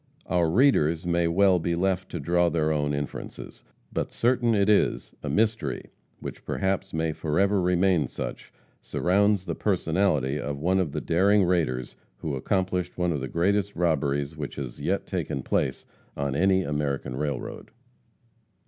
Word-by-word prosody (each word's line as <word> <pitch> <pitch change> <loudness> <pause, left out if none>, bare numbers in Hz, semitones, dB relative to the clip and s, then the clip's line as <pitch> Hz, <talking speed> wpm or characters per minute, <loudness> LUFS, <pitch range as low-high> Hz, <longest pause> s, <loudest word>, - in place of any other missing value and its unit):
Our 85 -3 +1
readers 85 - +3
may 85 -1 +2
well 95 +2 +4
be 85 +1 -1
left 95 +1 0
free - - -4
to - - -7
draw 85 0 +3
their 80 -2 +1
own 75 -1 0
inferences. 70 0 -6 0.3
But - - -2
certain 120 -1 +2
it 100 -1 +2
is, 105 -1 +2
a - - -4
mystery, 105 - 0 0.3
which - - -8
perhaps 95 0 -1
may 80 0 0
forever 95 +6 +1
remain 90 -2 +2
such, - - -6 0.3
surrounds 100 +1 +2
the 85 - -2
personality 80 -7 +1
of 70 0 -3
one 90 +6 +1
of 85 -6 0
the - - -3
daring 100 +4 +3
raiders 80 -9 0 0.2
who 75 0 -3
accomplished 90 +4 -1
one 90 -1 +1
of 75 - -3
the 65 - -3
greatest 100 +7 0
robberies 75 -3 0
which 75 -3 -5
has 65 -4 -6
yet - - -1
taken 70 - -3
place 65 - -1 0.3
on 70 -1 -1
any 95 +3 +3
American 70 -4 -2
railroad. 70 -2 -4
85 Hz, 155 wpm, -26 LUFS, 75-95 Hz, 0.3 s, well